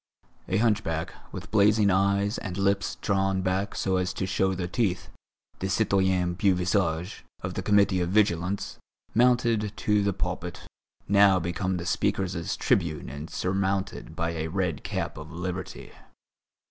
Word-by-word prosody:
A 95 - +1
hunchback, 105 -8 0 0.2
with - - -8
blazing 105 -1 +4
eyes 100 +3 +2
and 95 -3 -5
lips 100 0 +1
drawn 95 -2 +1
back 95 +2 -1
so 95 -1 0
as 90 0 -1
to 95 - -2
show 95 0 +1
the 90 -1 -3
teeth, 95 -3 -1 0.5
the 95 - -2
citoyen 95 -3 +2
Beauvisage, 90 -2 0 0.2
of - - -3
the - - -3
Committee 100 -3 +3
of 85 - -1
Vigilance, 100 -2 0 0.3
mounted 115 -3 +2
to 105 -1 +2
the 100 0 +1
pulpit, 90 -2 -4 0.5
now 100 -2 +5
become 90 +2 -2
the 85 - -5
speakers' 90 -2 -1
tribune 80 -8 0
and 70 +4 -7
surmounted 95 +1 -2
by 85 0 -1
a 80 -1 -3
red 90 -2 -2
cap - - -3
of 75 +2 -9
liberty. 90 +2 -5
95 Hz, 145 wpm, -27 LUFS, 90-100 Hz, 0.5 s, now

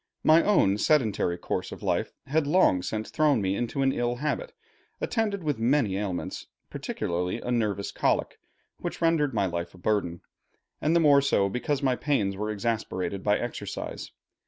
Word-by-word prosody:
My 160 +2 +6
own 105 - +3
sedentary 110 - +2
course - - -3
of - - -9
life - - 0
had 150 +1 0
long 150 - +4
since 110 +3 -4
thrown 150 -5 +3
me 95 -1 0
into 120 +5 -1
an 135 - +3
ill 120 -1 -1
habit, 155 - -2 0.5
attended 210 -5 -1
with 145 -6 -1
many 115 -4 +2
ailments, 95 -3 -4 0.2
particularly 90 +5 -3
a 125 - -4
nervous 105 -5 0
colic, - - 0 0.4
which - - -5
rendered 155 -6 +2
my 100 -2 +2
life 85 -1 -4
a - - -14
burden, 90 -3 -1 0.6
and 155 +3 +2
the - - +6
more 145 -3 +6
so 100 -8 +2
because 135 +6 -2
my 130 -2 +3
pains 115 -10 0
were 105 +2 -3
exasperated 105 -3 -2
by 105 +1 +2
exercise. 120 - -5
120 Hz, 165 wpm, -27 LUFS, 100-145 Hz, 0.6 s, My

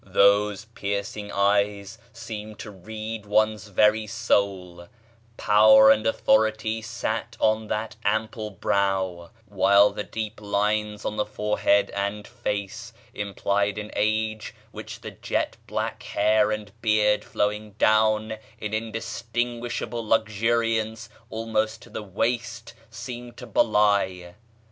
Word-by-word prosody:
Those 100 +1 +3
piercing 100 -1 -4
eyes 100 +1 +1
seemed 110 -1 -8
to 105 - -8
read 110 +2 -7
one's 110 0 +1
very 105 +2 +3
soul; 90 -4 -1 0.5
power 110 +1 +7
[page - - +10
xl] - - 0
and 110 - -3
authority 110 0 +2
sat 115 0 -4
on 110 0 +2
that 110 +1 -3
ample 110 +1 -1
brow; 95 -3 -1 0.2
while 100 0 +4
the 105 - -4
deep 110 -1 -6
lines 105 +1 -1
on 105 - -3
the 105 - +1
forehead 105 -1 +1
and 100 +1 -3
face 115 0 -4 0.2
implied 100 0 -1
an 105 0 -6
age 110 0 -1 0.2
which - - -9
the - - -7
jet - - -2
black - - -3
hair 105 +1 +2
and 105 -1 -4
beard 105 -1 +3
flowing 105 0 -2
down 110 +1 +2 0.2
in 105 -1 -5
indistinguishable 115 +1 -3
luxuriance 110 +1 0 0.2
almost 110 -1 -1
to 120 - -16
the 110 - -5
waist 115 +4 -3 0.2
seemed 120 +2 -8
to - - -8
belie. 100 -5 +2
105 Hz, 120 wpm, -25 LUFS, 100-110 Hz, 0.5 s, page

